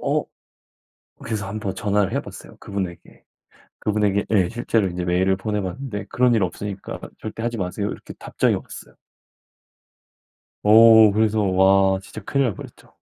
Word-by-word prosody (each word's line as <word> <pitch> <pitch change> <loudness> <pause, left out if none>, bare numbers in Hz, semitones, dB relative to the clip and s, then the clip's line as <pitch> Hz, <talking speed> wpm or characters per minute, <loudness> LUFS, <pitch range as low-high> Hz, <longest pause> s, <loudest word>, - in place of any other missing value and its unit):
어? - - 0 1.0
그래서 110 -3 -4
한번 105 -1 -4
전화를 100 -1 0
해 - - 0
봤어요 - - -12
그분에게, 95 -4 -6 0.6
그분에게 105 -1 0
예. 95 -5 +3
실제로 115 -3 0
이제 90 0 -4
메일을 95 +2 +1
보내 105 +2 -2
봤는데 105 +3 -5
"그런 125 -1 +2
일 110 - +2
없으니까 100 +2 -5 0.2
절대 110 +1 -7
하지 120 0 -2
마세요." 100 +2 -3
이렇게 - - -9
답장이 - - 0
왔어요. - - -10 1.7
어. 110 0 +7
그래서 110 +1 +1
와 95 0 +3
진짜 110 +2 -10
큰일 140 +6 0
날 115 - 0
뻔했죠. - - -13
105 Hz, 325 characters per minute, -22 LUFS, 95-110 Hz, 1.7 s, 어